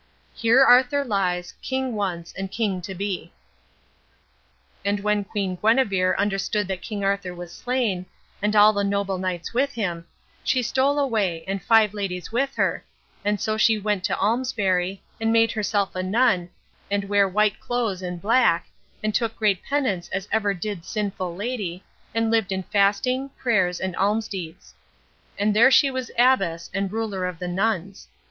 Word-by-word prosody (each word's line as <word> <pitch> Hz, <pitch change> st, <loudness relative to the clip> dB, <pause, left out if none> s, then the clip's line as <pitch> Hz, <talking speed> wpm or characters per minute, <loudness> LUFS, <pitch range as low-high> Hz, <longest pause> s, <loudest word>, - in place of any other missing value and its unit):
Here 235 Hz, +4 st, +4 dB
Arthur 260 Hz, +3 st, +5 dB
lies, 180 Hz, -5 st, -1 dB
King 260 Hz, -1 st, -2 dB
once 180 Hz, -5 st, -3 dB
and 195 Hz, 0 st, -4 dB
King 200 Hz, -4 st, -1 dB
to 190 Hz, +2 st, -7 dB
be. 195 Hz, 0 st, -4 dB, 1.5 s
And 200 Hz, +1 st, 0 dB
when 210 Hz, 0 st, +1 dB
Queen 195 Hz, -2 st, -3 dB
Guenever 205 Hz, -5 st, +2 dB
understood 200 Hz, 0 st, 0 dB
that 190 Hz, -1 st, -3 dB
King 205 Hz, -2 st, -5 dB
Arthur 195 Hz, -2 st, -1 dB
was 175 Hz, -1 st, -9 dB
slain, 230 Hz, -8 st, -1 dB, 0.3 s
and 210 Hz, +1 st, 0 dB
all 210 Hz, +1 st, +7 dB
the 205 Hz, -1 st, 0 dB
noble 200 Hz, -1 st, -1 dB
knights 185 Hz, 0 st, -3 dB
with 275 Hz, +3 st, +1 dB
him, 175 Hz, -7 st, -3 dB, 0.4 s
she 255 Hz, -1 st, +1 dB
stole 270 Hz, +4 st, +1 dB
away, 215 Hz, -, 0 dB
and 195 Hz, 0 st, -2 dB
five 220 Hz, -2 st, +4 dB
ladies 195 Hz, -3 st, -4 dB
with 270 Hz, +4 st, 0 dB
her; -, -, 0 dB, 0.4 s
and 205 Hz, 0 st, 0 dB
so 215 Hz, +3 st, -1 dB
she 220 Hz, 0 st, +4 dB
went 205 Hz, -2 st, -1 dB
to -, -, 0 dB
Almesbury, 195 Hz, -5 st, 0 dB, 0.2 s
and 225 Hz, 0 st, +1 dB
made 225 Hz, 0 st, +4 dB
herself 205 Hz, -3 st, -1 dB
a 185 Hz, -, -1 dB
nun, 190 Hz, -2 st, +2 dB, 0.4 s
and 200 Hz, 0 st, 0 dB
ware 200 Hz, 0 st, +2 dB
white 210 Hz, +1 st, +1 dB
clothes 230 Hz, -6 st, -2 dB
and 180 Hz, -1 st, -5 dB
black, 210 Hz, -4 st, +3 dB, 0.4 s
and 215 Hz, 0 st, 0 dB
took 225 Hz, -1 st, 0 dB
great 205 Hz, -4 st, +1 dB
penance 260 Hz, -11 st, -1 dB
as 195 Hz, +1 st, -3 dB
ever 205 Hz, -2 st, +1 dB
did 190 Hz, -1 st, -5 dB
sinful 190 Hz, -4 st, -3 dB
lady, 200 Hz, -4 st, -4 dB, 0.3 s
and 225 Hz, 0 st, +1 dB
lived 220 Hz, -4 st, +1 dB
in 190 Hz, 0 st, -2 dB
fasting, 215 Hz, +7 st, +1 dB
prayers, 185 Hz, -8 st, +1 dB
and 185 Hz, -2 st, -3 dB
alms 215 Hz, +3 st, +1 dB
deeds. 180 Hz, -3 st, -8 dB, 0.6 s
And 205 Hz, +1 st, +1 dB
there 235 Hz, +5 st, +7 dB
she 275 Hz, +1 st, +5 dB
was 260 Hz, -2 st, -4 dB
abbess 235 Hz, -10 st, +2 dB
and 195 Hz, 0 st, -1 dB
ruler 205 Hz, -4 st, -2 dB
of 180 Hz, -2 st, -6 dB
the 180 Hz, -, -5 dB
nuns. 195 Hz, 0 st, -2 dB
205 Hz, 165 wpm, -24 LUFS, 185-225 Hz, 1.5 s, all